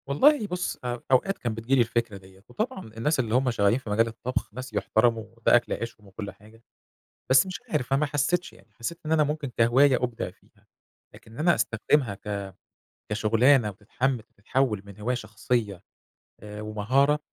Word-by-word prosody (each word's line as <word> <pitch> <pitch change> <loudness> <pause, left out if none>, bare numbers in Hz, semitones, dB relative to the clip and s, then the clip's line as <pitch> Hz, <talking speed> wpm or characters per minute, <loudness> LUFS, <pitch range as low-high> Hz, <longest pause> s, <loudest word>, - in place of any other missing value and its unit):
والله 235 - +4
بُص، 180 -1 -3
أ 120 -1 -3
أوقات 195 +10 +3
كان 120 -2 -3
بتيجي 115 +4 0
لي 130 - +5
الفكرة 115 -2 -1
ديَّة. 95 0 -18
وطبعًا 220 -1 -3
الناس 150 +6 +1
اللي 115 -2 0
هم 130 0 +3
شغالين 105 0 +3
في 130 - -10
مجال 115 +3 +3
الطبخ 125 0 -4
ناس 130 0 -7
يحترموا، 110 +2 +2
وده 115 - +4
أكل 120 - +2
عيشهم 115 -3 -6
وكل 100 +1 -7
حاجة. 110 +2 -19 0.7
بس 130 +8 +6
مش 185 -1 -6
عارف، 125 - -1
أنا 135 - +3
ما 150 - +2
حسيتش 145 +5 0
يعني، - - -19
حسيت 165 +9 -5
إن 155 - -3
أنا 160 -1 +4
ممكن 150 -1 -2
كهواية 130 +4 +5
أُبدع 120 -2 -2
فيها، - - -30 0.5
لكن 110 - -16
إن 115 - -10
أنا 170 +2 +4
أستخدمها 115 -1 +1
ك 100 -1 -5 0.6
كشُغلانة 115 +3 +4
وتتحمل 115 +5 -2 0.2
تتحول 110 0 0
من 100 -1 -12
هواية 120 +4 -1
شخصية، 105 -3 -2 0.6
آآ، 105 0 -8
ومهارة، 125 +8 +2
120 Hz, 175 wpm, -26 LUFS, 105-140 Hz, 0.7 s, بس